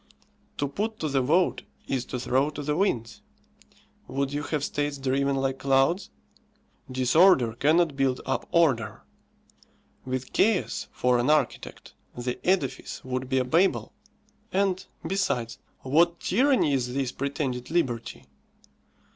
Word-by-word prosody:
To 145 - 0
put 215 +10 -3
to 155 - -1
the 135 -1 +1
vote 165 +8 +2 0.3
is 130 -2 -1
to 125 - -5
throw 130 +4 +1
to 150 -1 -7
the 150 +1 -1
winds. 120 - -1 0.9
Would 135 +1 -2
you 145 - -1
have 150 -1 -2
states 145 0 -2
driven 135 +1 0
like 135 0 -1
clouds? 135 +7 +2 0.8
Disorder 130 0 +4
cannot 155 +5 +2
build 135 -2 +1
up 135 - -2
order. 145 -10 +2 1.0
With 130 0 -4
chaos 215 -3 +1
for 125 -1 +1
an 120 +4 +1
architect, 155 0 -1 0.2
the 125 0 -3
edifice 140 -11 -1
would 130 0 -3
be 130 - +1
a 130 - +2
Babel. 170 +9 +1 0.6
And, 190 -1 +1 0.2
besides, 145 - -1 0.2
what 170 +6 +2
tyranny 250 - +2
is 125 -1 -1
this 135 -2 -1
pretended 135 -3 -3
liberty! 130 -9 -2
140 Hz, 130 wpm, -26 LUFS, 130-165 Hz, 1.0 s, Disorder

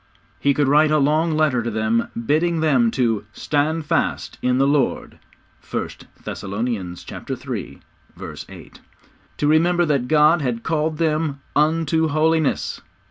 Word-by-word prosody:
He 140 -1 +2
could 145 -2 +2
write 150 +2 +4
a 155 - +3
long 155 +3 +2
letter 155 -6 +2
to 120 - -3
them, 110 +1 0 0.2
bidding 165 +5 +1
them 195 +10 +3
to 115 - 0
'Stand 155 +2 -1
fast 165 +1 -1
in 125 0 +1
the 135 - +3
Lord.' 140 -2 0 0.5
(1 - - -2 0.3
Thessalonians 100 -3 -4
iii. - - -6 0.7
8.) - - -13 0.6
To 145 - 0
remember 175 +3 +3
that 140 -5 0
God 155 +2 +4
had 120 -4 -2
called 155 -1 -1
them 155 -3 -1
'unto 160 +1 +2
Holiness.' 155 0 0
150 Hz, 135 wpm, -21 LUFS, 125-160 Hz, 0.7 s, write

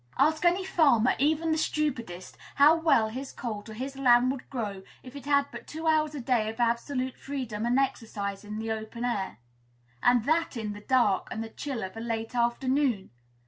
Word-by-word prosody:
Ask 310 +4 +3
any 360 +2 +3
farmer, 275 -10 +4
even 315 +3 +2
the 315 - +1
stupidest, 240 - -2 0.2
how 290 +3 +7
well 290 -10 +3
his 260 +5 -6
colt 220 -3 -6
or 215 - -8
his 265 +4 -5
lamb 250 -1 +4
would 265 -2 -7
grow 210 -7 -4 0.2
if 255 +1 -11
it 280 -2 -9
had 280 -1 +4
but - - -9
two 320 +1 -6
hours 310 -1 +2
a - - -4
day 235 -3 +1
of 225 +2 -8
absolute 255 +2 0
freedom 235 -6 -4
and 245 +2 +2
exercise 210 -7 -2
in 210 +1 -6
the 220 0 -3
open 220 +2 -4
air, 200 - -2 0.6
and 245 -2 +4
that 320 -3 +1
in 215 -2 -3
the 205 - -10
dark 215 -5 +2
and 220 - -4
the 225 - -7
chill 265 0 -5
of 190 +2 -6
a - - -6
late 225 0 -3
afternoon! 245 -2 +1
245 Hz, 195 wpm, -28 LUFS, 220-285 Hz, 0.6 s, how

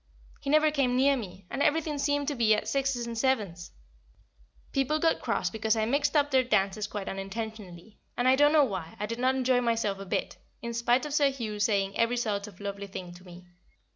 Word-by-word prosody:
He 275 - -5
never 310 +1 +4
came 270 -4 +1
near 275 +2 +4
me, 195 -6 -8
and 275 - -3
everything 300 -1 +1
seemed 285 0 0
to - - -2
be 225 -3 +4
at 210 - -4
sixes 270 -3 0
and 235 0 -5
sevens; 210 -9 -1 1.0
people 275 +3 +1
got 325 +1 +1
cross - - -1
because 220 0 0
I 220 -1 +1
mixed 285 +5 +1
up 290 -1 +3
their 260 -1 +4
dances 205 -3 0
quite 205 -2 -6
unintentionally, 200 -1 -7 0.2
and, 245 - +1
I 260 - +6
don't 290 +2 +5
know 305 -2 +6
why, 185 -8 -5
I 210 - -1
did 230 +2 -5
not 260 +1 +2
enjoy 255 -1 +2
myself 225 -4 0
a 195 - -7
bit, - - -2 0.2
in 235 0 -5
spite 240 +3 +2
of 295 - -5
Sir 285 -1 +4
Hugh 225 -6 -5
saying 200 -2 +1
every 230 +1 +1
sort 210 -3 -2
of 200 -3 -14
lovely 200 0 -5
thing 180 -2 -8
to 175 +1 -14
me. 180 -1 -13
235 Hz, 215 wpm, -28 LUFS, 200-275 Hz, 1.0 s, I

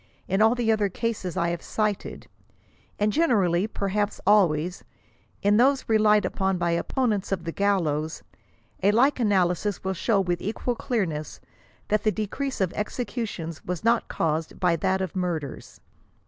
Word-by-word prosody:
In 195 +3 +1
all 225 +2 +5
the 235 -2 +1
other 210 -2 +1
cases 200 -4 -3
I 170 - +1
have 170 -1 -3
cited, 210 -2 -2 0.7
and 210 0 +1
generally, 205 - +2
perhaps 205 0 -2
always, 180 -4 +3 0.6
in 205 +1 +4
those 265 +3 +3
relied 215 -1 +4
upon 190 -1 0
by 170 -1 0
opponents 205 +3 -1
of 185 -3 -1
the 165 - -3
gallows, 160 -6 0 0.6
a 195 - +4
like 255 +7 +3
analysis 195 -2 +1
will 190 0 -1
show 200 +3 +1
with 175 -2 -1
equal 225 +4 -2
clearness 190 - -3 0.5
that 215 0 +2
the 215 - +2
decrease 260 +6 -3
of 190 -3 0
executions 210 -7 -4
was 180 -2 -4
not 230 +1 +2
caused 160 0 -2
by 175 -2 +3
that 190 +4 0
of 185 -2 -4
murders. 170 -7 -4
200 Hz, 150 wpm, -25 LUFS, 175-220 Hz, 0.7 s, all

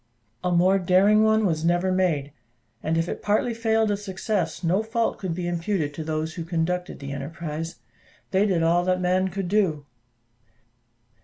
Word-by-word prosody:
A 180 - 0
more 185 +3 +4
daring 195 +4 +4
one 220 0 +3
was 160 -4 0
never 175 +2 +2
made; 165 -7 0 0.5
and 160 +1 0
if 165 +1 0
it - - -5
partly 215 +3 +1
failed 225 -1 +1
of 200 - -1
success, 190 -3 -2
no 180 +5 +2
fault 225 +1 -1
could 180 -4 -3
be 175 0 -3
imputed 170 -3 -1
to 160 - -5
those 155 0 -2
who 170 - -5
conducted 175 +2 -2
the 140 0 -7
enterprise: 160 +3 -5 0.6
they 195 +2 +3
did 175 -4 +1
all 170 +2 +3
that 185 0 +1
man 185 +1 +2
could 190 0 -4
do. 175 -7 +1
180 Hz, 170 wpm, -25 LUFS, 165-200 Hz, 0.6 s, more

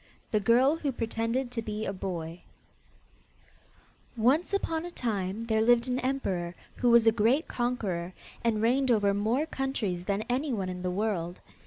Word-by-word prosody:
THE 215 - +3
GIRL 250 +9 +4
WHO 285 -4 -2
PRETENDED 230 +2 -2
TO 235 - -2
BE 215 0 -4
A 195 - -2
BOY 175 -3 -5 1.8
Once 265 +10 +3
upon 330 -5 -1
a 350 - -5
time 215 - -3
there 220 -1 +1
lived 240 +2 +4
an 255 0 0
emperor 190 -11 -2 0.2
who 245 - +2
was 235 -1 +6
a 225 - +7
great 235 +8 +2
conqueror, 200 -8 -2 0.3
and 220 -2 +1
reigned 260 +3 +3
over 205 -4 +3
more 225 +9 +1
countries 225 - -2
than 200 +1 -1
anyone 245 -7 -1
in 180 0 -5
the 180 - -1
world. 180 -3 -2
225 Hz, 160 wpm, -29 LUFS, 195-255 Hz, 1.8 s, a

